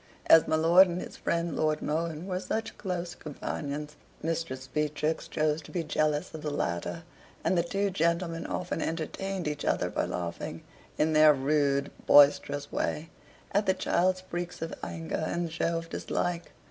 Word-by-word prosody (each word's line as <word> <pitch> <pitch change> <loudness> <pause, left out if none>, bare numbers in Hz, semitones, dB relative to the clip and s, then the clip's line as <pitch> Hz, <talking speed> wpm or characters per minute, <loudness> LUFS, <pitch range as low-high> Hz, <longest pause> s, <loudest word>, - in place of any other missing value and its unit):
As 165 - +7
my - - +2
lord 170 +4 +7
and 175 0 -3
his - - -7
friend 170 0 -1
Lord 155 -1 +1
Mohun 160 +1 -2
were 185 -1 -2
such 220 +4 -3
close 180 -3 -3
companions, 150 -1 -5 0.3
Mistress 160 -5 -2
Beatrix 150 +3 -1
chose 155 0 0
to - - -14
be 175 -3 -1
jealous 150 -1 0
of 160 - -6
the 150 - -2
latter; 115 - -2 0.4
and - - +2
the 170 - +4
two 195 +4 -1
gentlemen 170 -1 0
often 180 - -3
entertained 175 +3 -3
each 150 -1 -3
other - - 0
by - - 0
laughing, 85 -1 -4 0.3
in 155 +1 +2
their 155 -1 +7
rude 140 0 +1 0.2
boisterous 145 0 +5
way, 155 +2 -2 0.4
at 205 +1 +1
the 190 - +4
child's 185 0 +1
freaks 175 -1 -5
of 165 - -4
anger 85 - -3
and 170 -1 -2
show 165 +1 0
of 165 0 -5
dislike. 175 -1 -2
160 Hz, 165 wpm, -29 LUFS, 150-175 Hz, 0.4 s, As